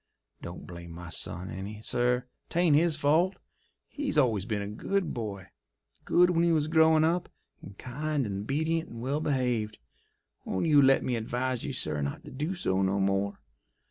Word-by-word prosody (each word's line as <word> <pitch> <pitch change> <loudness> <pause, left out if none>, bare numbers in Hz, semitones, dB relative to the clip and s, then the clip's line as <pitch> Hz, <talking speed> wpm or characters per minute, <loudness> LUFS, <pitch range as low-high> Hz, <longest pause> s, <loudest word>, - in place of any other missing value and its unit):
Don't 85 +1 -8
blame 85 -1 -9
my 85 0 -8
son 90 +3 -2
any, 100 +3 -6
sir—'tain't 125 +7 +1
his 165 +1 +4
fault. 155 +6 +2 0.5
He's 285 - -3
always 115 -9 +3
been 105 -2 -2
a - - -5
good 180 - -2
boy—good 100 - -2
when 170 -1 +2
he 170 - +3
was 155 -2 +2
growin' 160 0 +4
up, 170 +2 +1 0.3
and 100 -1 -11
kind 145 +2 -2
and 100 0 -4
'bedient 160 +3 0
and 115 - -9
well 135 +5 -1
behaved. 125 -7 -1 0.7
Won't 95 - -2
you 150 -3 +6
let 135 0 +5
me 125 - 0
advise 125 +2 -2
you, 140 - -3
sir, 75 - +1
not 70 0 -4
to - - -10
do 150 +8 -3
so 95 - 0
no 95 +1 +1
more? 100 +1 0
125 Hz, 170 wpm, -29 LUFS, 100-155 Hz, 0.7 s, you